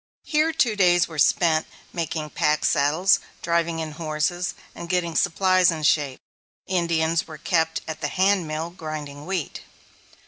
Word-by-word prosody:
Here 310 +1 +1
two 265 -9 +1
days 175 -3 +4
were 160 -2 -8
spent 160 +1 +3 0.3
making 155 -2 -3
pack 150 0 +1
saddles, 155 +8 +3 0.2
driving 170 -1 0
in 160 -1 -4
horses, 160 +3 -2 0.2
and 170 - -9
getting 175 -2 0
supplies 185 0 +3
in 160 -2 -2
shape. 145 -3 +1 0.5
Indians 170 -3 0
were 155 - -9
kept 160 +1 0
at 160 - -6
the - - 0
handmill 170 -4 0
grinding 150 -3 -7
wheat. 185 -6 -3
165 Hz, 140 wpm, -24 LUFS, 155-180 Hz, 0.5 s, days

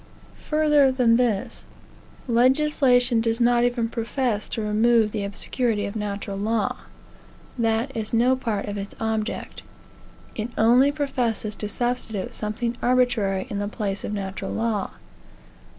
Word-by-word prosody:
Further 300 -3 +4
than 245 -3 +3
this; 230 -6 -1 0.6
legislation 250 -1 +3
does 225 0 0
not 240 0 +3
even 240 -1 +1
profess 230 -1 -2
to 225 - -3
remove 220 +1 +3
the 210 -2 -3
obscurity 205 +2 -1
of 200 +2 -6
natural 200 -1 -4
law. 220 +1 0 0.8
That 230 +3 0
is 220 -2 -3
no 245 +3 +3
part 225 -6 -3
of 205 0 -4
its 200 +1 -7
object. 220 -1 -3 0.7
It 220 +2 -4
only 245 +5 +5
professes 245 -7 -2
to 210 - -4
substitute 240 -4 -2
something 230 +3 -3
arbitrary 245 -7 +1
in 200 - -2
the 205 - -2
place 200 -2 -3
of - - -4
natural 195 -2 -4
law. 220 -3 -1
230 Hz, 135 wpm, -24 LUFS, 210-245 Hz, 0.8 s, only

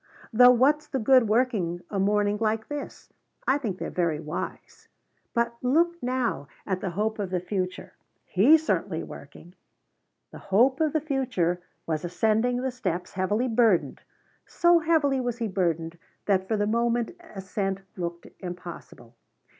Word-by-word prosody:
Though 245 +2 +8
what's 275 +5 +3
the 270 - -2
good 255 0 +4
working 210 -7 0
a 200 - -1
morning 205 +1 +2
like 220 0 -1
this? 290 -1 -7 0.3
I 270 +2 +3
think 210 -9 -3
they're - - -5
very 170 -4 0
wise. 155 +1 -7 0.5
But 235 0 +1
look 340 +7 +2
now 245 - -1 0.2
at 185 -1 -2
the 190 - -2
Hope 215 +5 -2
of 200 -3 -2
the 180 -1 -1
Future! 185 0 -4 0.3
He's 300 +12 +5
certainly 180 - -1
working." 160 +5 -12 0.8
The - - -10
Hope 250 +9 +2
of 310 -2 +2
the 310 - +1
Future 250 - -1 0.2
was 155 -2 -2
ascending 220 +8 +1
the 265 - -1
steps, 185 -8 -4
heavily 205 +6 0
burdened. 225 -6 +2 0.5
So 345 0 +4
heavily 310 -5 +2
was 245 -1 -2
he 230 -2 -2
burdened 170 -3 -1 0.3
that 190 -2 +1
for 220 - 0
the 205 - +1
moment 235 +5 0 0.2
ascent 195 0 -3
looked 170 -1 -5
impossible. 175 -9 -9
215 Hz, 150 wpm, -26 LUFS, 180-250 Hz, 0.8 s, Though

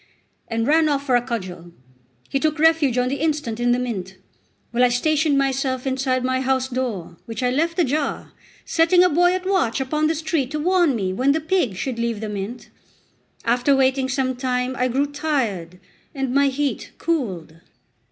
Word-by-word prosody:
and 225 0 -1
ran 310 +3 +4
off 280 -1 -1
for 255 -3 +2
a 245 - +4
cudgel. 185 -8 -6 0.6
He 275 - -1
took 310 +1 0
refuge 310 -5 +3
on 250 0 +2
the 275 +2 -2
instant 295 -8 -1
in 240 0 +2
the 245 - +3
mint; 195 -7 -4 0.5
while 240 +1 +2
I 250 - +5
stationed 300 +4 +2
myself 265 -1 0
inside 260 -1 0
my 260 0 0
housedoor, 255 -9 -2
which 225 +1 -5
I 250 - +2
left 330 +6 0
ajar, 295 -3 -1 0.3
setting 340 +2 +4
a 365 - +4
boy 355 +3 +3
at 370 0 -4
watch 375 - +1
upon 300 +4 0
the 320 - 0
street 315 -4 -1
to 305 - -1
warn 350 -3 +3
me 190 -4 -1
when 260 +7 +2
the 315 - 0
pig 315 - 0
should 235 +4 -4
leave 235 -2 -1
the 215 0 -4
mint. 205 +4 -6 0.7
After 245 +4 +3
waiting 265 0 +2
some 260 -1 0
time, 250 0 -1
I 255 - +1
grew 265 +3 +1
tired, 255 - -2 0.4
and 270 -2 -2
my 280 +1 +4
heat 275 +1 -2
cooled. 190 - -2
260 Hz, 180 wpm, -22 LUFS, 240-300 Hz, 0.7 s, I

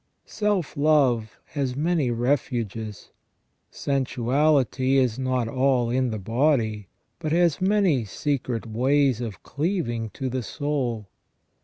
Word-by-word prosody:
Self 205 -7 -1
love 140 -7 +2
has 135 -4 -2
many 155 -2 +1
refuges. 115 -4 -2 0.6
Sensu 135 -3 -2
ality 135 0 +2
is 130 -3 +2
not 130 -2 0
all 130 -1 +1
in 130 0 +1
the 110 - -3
body, 110 -1 0 0.3
but 155 -2 -3
has 170 0 +2
many 190 - +3
secret 125 0 -2
ways 130 +2 +2
of 115 -4 -6
cleaving 140 - -2
to 130 - -3
the 130 0 -2
soul. 125 -5 -2
130 Hz, 120 wpm, -25 LUFS, 115-145 Hz, 0.6 s, many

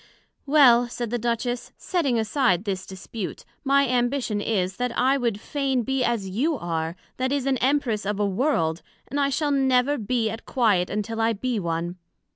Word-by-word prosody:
Well, 250 -5 +6
said 235 -1 -5
the 240 - -1
Duchess, 240 +1 -2
setting 300 -10 0
aside 220 - +1
this 195 -3 -3
dispute, 190 +1 -7 0.2
my 280 0 +3
Ambition 245 -3 0
is, 190 -4 -1
That 250 0 -1
I 260 +2 +3
would 235 -6 -1
fain 270 -1 -1
be 265 +1 0
as 235 -5 0
you 270 - 0
are, 165 -3 -3 0.2
that 260 +1 -1
is, 280 -2 0
an 270 -1 +2
Empress 255 -5 +1
of 205 +1 -2
a 205 - +2
World, 190 - 0 0.3
and 285 - -2
I 280 -1 +2
shall 290 +1 0
never 265 0 +2
be 230 +1 0
at 225 +1 -8
quiet 205 -8 +2
until 215 +2 -2
I 225 +1 +2
be 235 +2 -2
one. 170 0 -3
240 Hz, 180 wpm, -24 LUFS, 205-270 Hz, 0.3 s, Well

